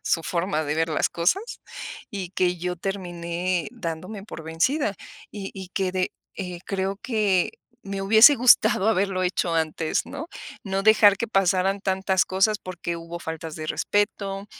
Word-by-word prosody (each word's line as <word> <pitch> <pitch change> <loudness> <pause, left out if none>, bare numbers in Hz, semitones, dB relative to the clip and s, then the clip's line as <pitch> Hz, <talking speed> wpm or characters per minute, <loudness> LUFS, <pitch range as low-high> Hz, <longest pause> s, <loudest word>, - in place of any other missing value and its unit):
su 165 - +1
forma 170 -1 -1
de 150 +1 -1
ver 165 +1 +1
las 155 - +1
cosas 175 - +1 0.7
y 190 -4 -5
que 180 -1 +1
yo 180 +1 -3
terminé 175 -1 -3
dándome 185 -1 -6
por 165 - -8
vencida 200 - 0 0.4
y 200 -2 -6
y 190 -2 -8
quedé, 185 -2 0 0.2
eh, 180 -3 -5
creo 195 0 -2
que 210 -7 +1 0.3
me 195 0 -4
hubiese 220 +8 +8
gustado 235 -4 +5
haberlo 195 -3 +1
hecho 180 -1 0
antes, 160 0 0
¿no? 305 - -7 0.4
No 195 -1 -1
dejar 210 -1 +6
que 230 - -2
pasaran 195 -1 +2
tantas 190 -1 +1
cosas, 195 +3 +2
porque 170 -2 -5
hubo 170 +1 -7
faltas 160 -1 -6
de 155 - -5
respeto, 200 +2 -1
190 Hz, 150 wpm, -24 LUFS, 170-200 Hz, 0.7 s, hubiese